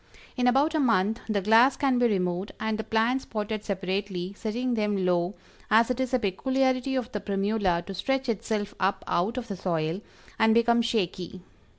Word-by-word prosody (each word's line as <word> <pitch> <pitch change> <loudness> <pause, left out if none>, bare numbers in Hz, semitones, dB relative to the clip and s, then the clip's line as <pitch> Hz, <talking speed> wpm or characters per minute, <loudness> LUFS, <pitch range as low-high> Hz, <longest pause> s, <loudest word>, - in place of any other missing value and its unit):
In 250 -1 +1
about 275 +6 +3
a 315 - +1
month 225 -4 +2
the 205 -2 +1
glass 225 +6 +5
can 265 -3 +2
be 245 - +4
removed 185 -2 -1
and 220 0 -2
the - - -2
plants 230 +5 +1
potted 215 -1 -4
separately, 190 -1 -3
setting 240 +4 -2
them 210 -4 0
low, 175 +1 +1 0.3
as 225 +3 +4
it 250 - -3
is 260 -1 -1
a 255 - +3
peculiarity 260 +5 0
of 255 -3 -2
the 210 - -3
Primula 195 -3 0
to 195 - -6
stretch 265 +7 -1
itself 210 -2 -2
up 190 +1 0
out 200 +8 0
of 245 -2 -4
the 200 - -4
soil, 170 -1 -2 0.4
and 220 0 +4
become 235 0 +4
shaky. 185 -5 -2
220 Hz, 185 wpm, -27 LUFS, 190-245 Hz, 0.4 s, glass